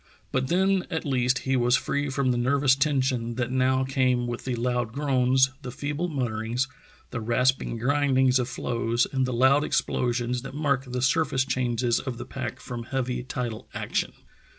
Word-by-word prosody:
But 130 +1 0
then 190 +2 +2
at 160 -2 -3
least 130 -2 +2
he 135 0 +1
was 125 0 +3
free 145 0 -1
from 135 -1 +1
the 120 - 0
nervous 135 +2 +3
tension 130 -5 0
that 120 0 -2
now 130 0 +2
came 130 -2 +1
with 120 0 -5
the 130 -2 -1
loud 120 -1 -1
groans, 130 -2 +3
the 125 - -6
feeble 145 +6 -3
mutterings, 120 -2 -1 0.4
the 125 - -3
rasping 120 +1 +1
grindings 130 0 +3
of 125 0 -1
floes, 120 -1 0
and 130 -1 +1
the - - -2
loud 130 +4 +4
explosions 120 -3 0
that 135 +1 -8
mark 140 -3 0
the 125 0 -2
surface 135 -2 +2
changes 120 -2 0
of 130 -3 -5
the - - -6
pack - - -5
from 120 -2 -6
heavy 125 -1 -2
tidal 120 -3 -5
action. - - -2
130 Hz, 175 wpm, -26 LUFS, 120-135 Hz, 0.4 s, loud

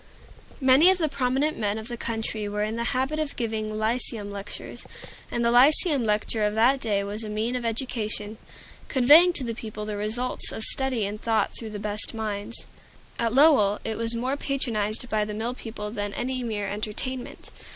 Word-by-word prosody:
Many 270 +5 +6
of 375 - +4
the 325 -3 +1
prominent 275 +3 0
men 210 -1 0
of 220 0 -7
the 240 - -4
country 225 -2 -3
were 210 0 -2
in 215 +1 -2
the 235 0 -2
habit 265 +5 -1
of 305 -2 -3
giving 215 -2 -3
Lyceum 220 -2 -2
lectures, 200 0 -7 0.4
and 235 0 -1
the 235 - +3
Lyceum 280 +3 +5
lecture 215 0 0
of 210 0 0
that 250 +5 +4
day 205 -5 0
was 205 +3 -2
a 215 - -6
means 220 +4 -2
of 245 -1 -3
education, 220 -3 -2 0.5
conveying 295 +8 +6
to 280 - -2
the 230 -2 -3
people 215 -2 -7
the 210 -1 -4
results 220 +5 -2
of 220 - -4
study 260 -5 +1
and 205 +1 -5
thought 225 -1 0
through 225 - -7
the 210 - -6
best 210 +2 -2
minds. 215 0 -1 0.5
At 230 -1 +1
Lowell 255 -7 +5
it 220 - -3
was 230 +1 +1
more 255 +4 -1
patronized 235 -5 -1
by 215 -3 0
the 210 0 -5
mill 230 +3 -2
people 220 -4 -7
than 205 -2 -4
any 255 0 -2
mere 210 -3 -3
entertainment. 215 +5 -4
225 Hz, 190 wpm, -25 LUFS, 210-255 Hz, 0.5 s, Many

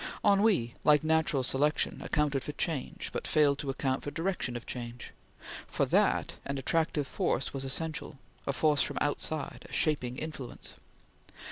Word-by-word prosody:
Ennui, 200 - +4
like 150 -1 +5
Natural 160 -4 +2
Selection, 145 +4 +2
accounted 150 -3 0
for 150 - -5
change, 150 -3 -2
but - - -3
failed 145 -2 +3
to 140 - -3
account 135 0 -1
for - - -4
direction 165 -4 -1
of 120 - -10
change. 120 -1 -6 0.6
For - - +1
that, - - +2
an 140 0 -3
attractive 150 +1 +1
force 130 -1 -1
was 135 -1 -3
essential; 150 +1 -2 0.3
a - - +2
force 150 0 +3
from - - -1
outside; 145 +1 -1
a - - -15
shaping 130 -5 0
influence. 150 -5 -4
145 Hz, 150 wpm, -30 LUFS, 135-155 Hz, 0.6 s, like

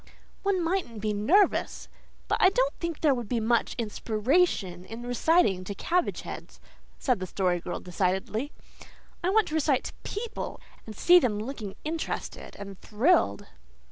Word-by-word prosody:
"One 390 -3 +1
mightn't 330 - -1
be 210 0 -1
nervous, 320 - +2 0.4
but - - 0
I 370 - +8
don't - - +1
think 335 -2 -4
there 300 -3 +5
would 240 -5 -4
be 240 - +1
much 225 +1 +1
inspiration 220 - 0
in 225 +5 -8
reciting 245 - +2
to 200 - -5
cabbage 350 - 0
heads," - - -9 0.4
said 250 -6 +1
the 185 - -4
Story 180 -1 0
Girl - - -5
decidedly. 190 - -1 0.7
"I 360 - +2
want 435 +2 +3
to - - -7
recite 295 -4 +2
to - - -6
PEOPLE, 445 +2 -5 0.3
and 215 - -8
see 355 - +7
them 235 -9 0
looking 215 -4 -6
interested 315 +1 -4
and 200 -1 -9
thrilled." 255 +13 +2
245 Hz, 155 wpm, -28 LUFS, 205-340 Hz, 0.7 s, I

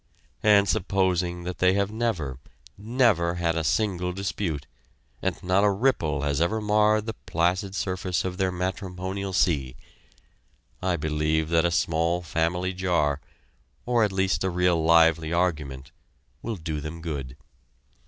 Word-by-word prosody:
And 100 -1 +5
supposing 90 -2 0
that 90 +1 -5
they 90 0 +4
have 100 +1 0
never, 95 - -2 0.4
never 105 -6 +2
had 85 -1 0
a 80 - -1
single 90 +1 0
dispute, 90 -6 -3 0.6
and - - -1
not 90 +2 +2
a 105 - +5
ripple 95 - +1
has 70 +1 0
ever 110 +6 +1
marred 105 0 +2
the 110 - -3
placid 90 +3 -1
surface 95 -2 -2
of 90 -1 -3
their 95 -1 +1
matrimonial 95 +1 -4
sea, 75 -9 +1 1.1
I 90 -1 +1
believe 75 0 0
that 85 0 +3
a - - +3
small 85 +1 0
family 85 +4 -1
jar 85 -6 0 0.6
or 120 -2 +2
at 105 - +1
least 95 -3 0
a 95 - +1
real 90 -2 +2
lively 80 -1 +4
argument 75 -7 -1 0.5
will 115 -1 -3
do 80 -4 -4
them 80 +2 -7
good. 70 -6 -5
90 Hz, 145 wpm, -26 LUFS, 80-95 Hz, 1.1 s, And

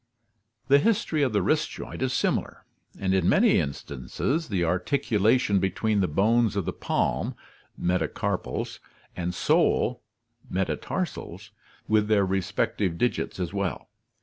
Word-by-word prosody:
The 140 +1 +6
history 205 -6 +1
of 135 -3 +2
the 105 - +1
wrist 155 0 +1
joint - - -8
is 130 -1 +1
similar, - - -1 0.3
and 95 -1 0
in 95 -2 +3
many - - +5
instances 70 - -3
the 95 -5 0
articulation 105 +3 +2
between 105 +3 0
the 95 - +2
bones 110 +7 +2
of 100 -4 -1
the - - -2
palm - - -1 0.4
(metacarpals) 90 +1 -2 0.4
and 90 0 -2
sole 90 - +2 0.5
(metatarsals) 100 - -3 0.4
with 110 -1 +3
their 105 -2 +3
respective 95 -1 -1
digits 120 -2 -1
as 90 0 -3
well. 100 +1 -3
100 Hz, 125 wpm, -26 LUFS, 90-120 Hz, 0.5 s, The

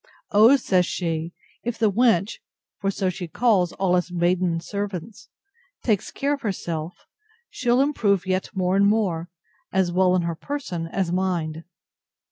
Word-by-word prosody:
O! 220 +6 +7
says 185 -9 +2
she, 165 -1 -2 0.3
if 240 0 -3
the 220 -2 +2
wench 215 -3 +2 0.4
(for 195 - 0
so 190 -1 -1
she 180 -1 -6
calls 190 -2 +2
all 190 -2 +1
us 180 0 0
maiden 175 -1 +1
servants) 200 +1 -6 0.5
takes 210 -5 +1
care 285 +1 -1
of 280 - -4
herself, 170 -5 -4 0.5
she'll 245 0 +2
improve 210 - +1
yet 185 0 -1
more 185 0 +1
and 200 +1 +4
more, 185 -6 0 0.4
as 190 -2 +1
well 185 0 +3
in 180 - +1
her 170 0 -1
person 180 - -5
as 175 0 -2
mind. 170 -4 -1
185 Hz, 150 wpm, -24 LUFS, 175-210 Hz, 0.5 s, O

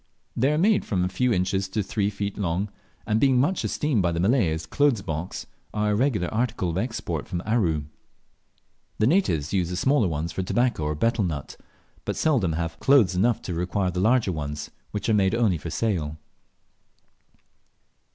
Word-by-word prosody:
They 135 +5 +2
are 150 - +1
made 205 +5 +3
from 95 -4 -1
a - - -1
few 125 +6 +1
inches 95 0 0
to 95 - -25
two 110 - 0
or - - -3
three 100 +1 -1
feet 100 0 -4
long, 95 +1 -1 0.4
and 110 +1 +1
being 130 -1 +4
much 165 +8 +1
esteemed 145 -8 0
by 85 -1 +1
the 85 - -2
Malay 100 0 +3
as 80 +1 -3
clothes 125 - +2
boxes, 80 +1 -4 0.3
are 105 0 +1
a - - +2
regular 110 -6 +1
article 110 -6 0
of 85 - -2
export 95 - -3
from 90 0 -4
Aru. 90 -10 +1 1.1
The 110 - +2
natives 105 - +1
use 90 -3 +1
the 90 - -3
smaller 130 +2 +2
ones 80 0 -2
for - - -3
tobacco 120 -3 0
or 75 0 -1
betel 115 +6 +1
nut, 75 -6 -4 0.5
but - - -3
seldom 120 - +1
have 80 0 -3
clothes 130 -10 +5
enough 115 +5 +2
to 90 - -4
require 90 +2 -1
the 90 - -3
larger 110 0 +3
ones, 75 -2 -5 0.2
which 105 - -4
are - - +2
only 100 -3 +4
made 100 -10 +2
for 85 - -5
sale. 80 -8 -1
95 Hz, 190 wpm, -25 LUFS, 85-120 Hz, 1.1 s, clothes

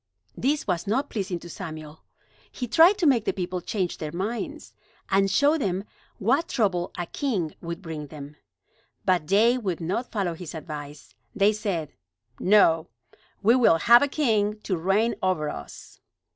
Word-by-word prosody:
This 290 +3 0
was 180 0 -2
not 265 +8 0
pleasing 190 -4 -2
to 175 - -10
Samuel. 155 -3 -8 0.5
He 250 - -5
tried 335 - +6
to 370 - 0
make 250 -7 +4
the - - 0
people 180 -1 -3
change 185 -1 -3
their 155 -2 -4
minds, 200 +8 -4 0.4
and 195 0 +3
showed 285 +9 +3
them 190 -3 -1 0.3
what 265 - +1
trouble 190 - 0
a 175 - -2
king 195 - -2
would 170 +2 -6
bring 155 -3 -6
them. 145 0 -10 0.7
But 180 -5 +2
they 230 +7 +4
would 190 -7 -3
not 190 +9 -3
follow 195 -6 -1
his 165 0 -8
advice. 150 -2 -8 0.2
They 205 +1 +4
said: 195 -8 -3 0.5
"No; 175 -5 +4 0.6
we 225 +4 +6
will 240 -10 +5
have 235 +8 +6
a 285 - +3
king 215 -8 0
to 190 - -1
reign 195 +7 +1
over 185 -6 0
us." 70 - -10
195 Hz, 160 wpm, -25 LUFS, 165-230 Hz, 0.7 s, tried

